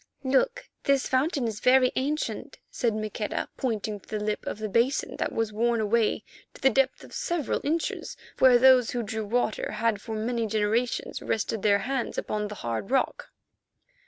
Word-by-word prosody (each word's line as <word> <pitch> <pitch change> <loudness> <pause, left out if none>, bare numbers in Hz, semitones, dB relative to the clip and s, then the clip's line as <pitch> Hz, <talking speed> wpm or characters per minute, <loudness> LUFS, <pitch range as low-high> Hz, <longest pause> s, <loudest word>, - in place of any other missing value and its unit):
"Look, 485 - +1 0.2
this 275 -1 +2
fountain 265 -1 +1
is 215 -2 -4
very 255 +1 +5
ancient," 295 +4 -2
said 230 -3 0
Maqueda, 215 0 -3
pointing 215 -4 -2
to - - -23
the 215 - -2
lip 210 0 -2
of - - -3
the 215 0 -3
basin 235 +7 +1
that - - -1
was 225 -2 -1
worn 235 +2 +1
away 220 +1 +1 0.3
to - - -14
the 270 - +5
depth 270 +2 +1
of - - -13
several 340 -5 -1
inches 320 +3 -2 0.2
where 255 -2 +7
those 255 -2 +6
who 240 -1 -2
drew 220 0 -3
water 235 0 -1
had 225 -3 0
for 220 0 -5
many 230 +1 -1
generations 220 +3 -1
rested 220 -1 -1
their 200 -1 +4
hands 265 -2 -2
upon 210 0 -2
the 210 - -7
hard 115 +10 -3
rock. 265 +1 0
235 Hz, 175 wpm, -27 LUFS, 215-260 Hz, 0.3 s, where